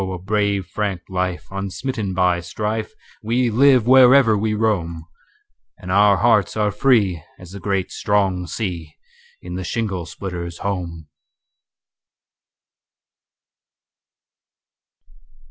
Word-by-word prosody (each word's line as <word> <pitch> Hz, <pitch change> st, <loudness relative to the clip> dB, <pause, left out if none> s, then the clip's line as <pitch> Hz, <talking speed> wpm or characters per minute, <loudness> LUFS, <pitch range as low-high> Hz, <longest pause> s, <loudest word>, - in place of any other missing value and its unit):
a 95 Hz, -, -4 dB
brave 100 Hz, 0 st, -1 dB
frank 100 Hz, -3 st, -3 dB
life, 90 Hz, -1 st, -2 dB
unsmitten 100 Hz, +3 st, -4 dB
by 90 Hz, -1 st, +2 dB
strife, 105 Hz, +5 st, -4 dB, 0.3 s
We 120 Hz, +2 st, 0 dB
live 130 Hz, 0 st, +4 dB
wherever 130 Hz, -2 st, +6 dB
we 105 Hz, +1 st, -1 dB
roam, 85 Hz, -7 st, -1 dB, 0.7 s
And 90 Hz, -, -7 dB
our 100 Hz, 0 st, +5 dB
hearts 110 Hz, -4 st, +2 dB
are 105 Hz, -1 st, +1 dB
free 100 Hz, -, +2 dB, 0.2 s
as 90 Hz, -1 st, -13 dB
the 100 Hz, -, -8 dB
great 95 Hz, 0 st, -2 dB
strong 95 Hz, -3 st, 0 dB
sea, 85 Hz, -8 st, -5 dB, 0.5 s
In 90 Hz, -, -7 dB
the 95 Hz, +1 st, -4 dB
shingle 95 Hz, -5 st, -3 dB
splitter's 85 Hz, -3 st, -6 dB
home. 85 Hz, -5 st, -4 dB
100 Hz, 105 wpm, -20 LUFS, 90-110 Hz, 0.7 s, wherever